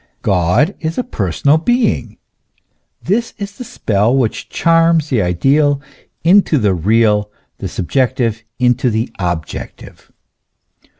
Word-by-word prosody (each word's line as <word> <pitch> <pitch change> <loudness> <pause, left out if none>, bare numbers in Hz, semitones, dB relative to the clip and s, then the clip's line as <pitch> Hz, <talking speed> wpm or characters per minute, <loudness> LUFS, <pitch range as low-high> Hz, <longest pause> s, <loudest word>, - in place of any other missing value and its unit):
God 95 - +2
is 160 0 -4
a 250 - 0
personal 140 - 0
being: 240 +6 0 0.9
this 225 +5 -1
is 200 -1 -6
the - - -4
spell, 115 - 0
which 120 -5 -2
charms 165 -2 +2
the 120 -5 +2
ideal 135 - +2 0.4
into 175 -2 +4
the 105 -6 +2
real, 105 +3 +2 0.3
the - - -4
subjective 115 +1 -1
into 125 +1 +2
the 110 +2 -2
objective. 85 -4 -6
125 Hz, 115 wpm, -16 LUFS, 105-165 Hz, 0.9 s, into